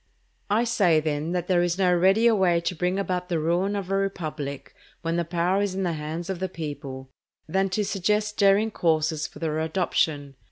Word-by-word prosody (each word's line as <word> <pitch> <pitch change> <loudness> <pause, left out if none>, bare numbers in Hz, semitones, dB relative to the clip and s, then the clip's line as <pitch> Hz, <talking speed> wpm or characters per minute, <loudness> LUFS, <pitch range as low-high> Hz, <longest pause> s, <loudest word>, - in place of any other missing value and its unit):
I 215 +3 +3
say, 200 -9 +3
then, 155 +1 -2
that 175 -1 -1
there 180 -1 +2
is 175 0 0
no 185 -2 +3
readier 195 +6 +4
way 180 -4 +3
to 170 +2 -2
bring 180 +2 -1
about 180 -2 -2
the 170 - 0
ruin 175 +6 0
of 195 -2 -4
a - - +2
republic, 155 -8 -4 0.3
when 165 0 -1
the 170 - +1
power 175 +3 0
is 200 -2 -1
in 195 - -1
the 175 -2 0
hands 155 +3 -5
of 190 -3 -3
the 190 0 -2
people, 140 -5 -7 0.4
than 190 +4 +1
to 205 +2 -1
suggest 210 +3 0
daring 205 +2 +4
courses 160 -3 0
for - - -15
their 155 -1 -2
adoption. 155 -4 -1
175 Hz, 200 wpm, -25 LUFS, 160-195 Hz, 0.4 s, readier